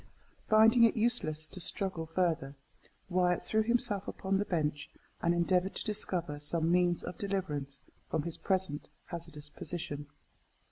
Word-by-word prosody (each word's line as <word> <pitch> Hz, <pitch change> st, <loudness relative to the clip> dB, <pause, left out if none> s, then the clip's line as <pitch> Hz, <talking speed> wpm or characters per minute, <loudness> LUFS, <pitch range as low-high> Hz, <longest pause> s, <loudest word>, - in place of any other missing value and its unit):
Finding 220 Hz, +2 st, +7 dB
it 230 Hz, -, +5 dB
useless 215 Hz, -10 st, +1 dB
to 185 Hz, -, -8 dB
struggle 175 Hz, -2 st, -2 dB
further, 160 Hz, -5 st, 0 dB, 0.5 s
Wyat 180 Hz, -1 st, +2 dB
threw 220 Hz, -, +2 dB
himself 215 Hz, -3 st, +1 dB
upon 195 Hz, 0 st, -1 dB
the 205 Hz, -, 0 dB
bench, 150 Hz, -4 st, -1 dB, 0.3 s
and 170 Hz, -, +3 dB
endeavoured 180 Hz, +2 st, +2 dB
to -, -, -3 dB
discover 180 Hz, -8 st, -1 dB
some 160 Hz, +3 st, 0 dB
means 175 Hz, -1 st, +3 dB
of 180 Hz, -, -6 dB
deliverance 150 Hz, -9 st, -2 dB, 0.3 s
from 160 Hz, -, 0 dB
his 170 Hz, 0 st, -4 dB
present 185 Hz, -6 st, 0 dB, 0.2 s
hazardous 150 Hz, -3 st, -7 dB
position. 145 Hz, -3 st, -4 dB
175 Hz, 140 wpm, -32 LUFS, 155-195 Hz, 0.5 s, Finding